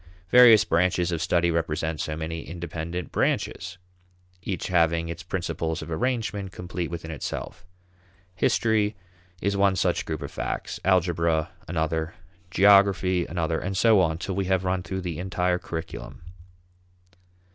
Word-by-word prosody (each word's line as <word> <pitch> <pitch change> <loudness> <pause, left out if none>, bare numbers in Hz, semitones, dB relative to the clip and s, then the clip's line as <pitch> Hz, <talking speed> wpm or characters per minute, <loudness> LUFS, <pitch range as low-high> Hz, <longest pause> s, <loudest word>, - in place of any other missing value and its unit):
Various 115 -4 +8
branches 90 0 +1
of 85 -2 -2
study 85 +1 +2
represent 80 -1 -1
so 75 - -3
many 80 +1 -4
independent 85 0 -5
branches, 90 +1 -1 0.6
each 95 -2 -4
having 85 -2 +2
its 85 - -6
principles 85 -3 -3
of - - -9
arrangement 105 +1 -2
complete 90 -1 -5
within 85 -1 -6
itself. 85 +2 -6 0.7
History 105 +2 +1 0.5
is 100 0 +1
one 100 -1 +3
such 90 -2 0
group 80 -2 -3
of - - -6
facts; - - -4
algebra 85 -4 +2 0.2
another; 80 -1 -2 0.3
geography 95 -2 +4
another, 80 -1 -1
and 95 0 -3
so 110 0 +5
on 80 -3 +1
till 95 +3 -4
we 95 +1 -1
have 95 0 +1
run 90 0 0
through 95 +2 -4
the 85 -3 -4
entire 90 -1 0
curriculum. 80 -6 -7
90 Hz, 135 wpm, -25 LUFS, 80-95 Hz, 0.7 s, Various